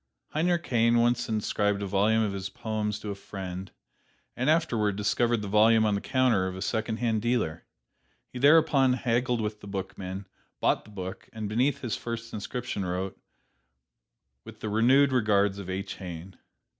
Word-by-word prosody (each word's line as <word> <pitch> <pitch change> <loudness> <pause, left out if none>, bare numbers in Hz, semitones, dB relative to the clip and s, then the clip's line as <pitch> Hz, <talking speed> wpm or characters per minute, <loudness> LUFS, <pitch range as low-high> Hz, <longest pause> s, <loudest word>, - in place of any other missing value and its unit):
Heinrich 170 +2 0
Heine 115 -1 +3
once 120 0 +2
inscribed 105 -2 0
a - - -1
volume 105 +3 +2
of 105 -2 -1
his 95 0 -4
poems 110 -3 -3
to 105 - -4
a - - -2
friend, 95 -2 -7 0.7
and 130 +4 0
afterward 115 - +2
discovered 105 +2 +1
the - - -4
volume 110 +2 +5
on 105 - +2
the 100 - -1
counter 125 -8 +2
of 95 - -5
a 95 - -7
secondhand 110 0 -1
dealer. 115 -9 -1 0.7
He 125 - -5
thereupon 145 -2 +5
haggled 120 -1 0
with 105 0 -4
the - - -10
bookman, 95 0 -5 0.3
bought - - +1
the - - -15
book 95 -3 -7
and 110 -2 -4
beneath 130 +6 +1
his 120 -5 -2
first 115 0 -6
inscription 110 0 -4
wrote, 90 +1 -3 1.3
"With - - -12
the 110 - -3
renewed 130 +6 +4
regards 105 -5 +2
of 95 -2 -7
H. 95 +1 -4
Heine." 90 0 -8
110 Hz, 165 wpm, -28 LUFS, 100-120 Hz, 1.3 s, volume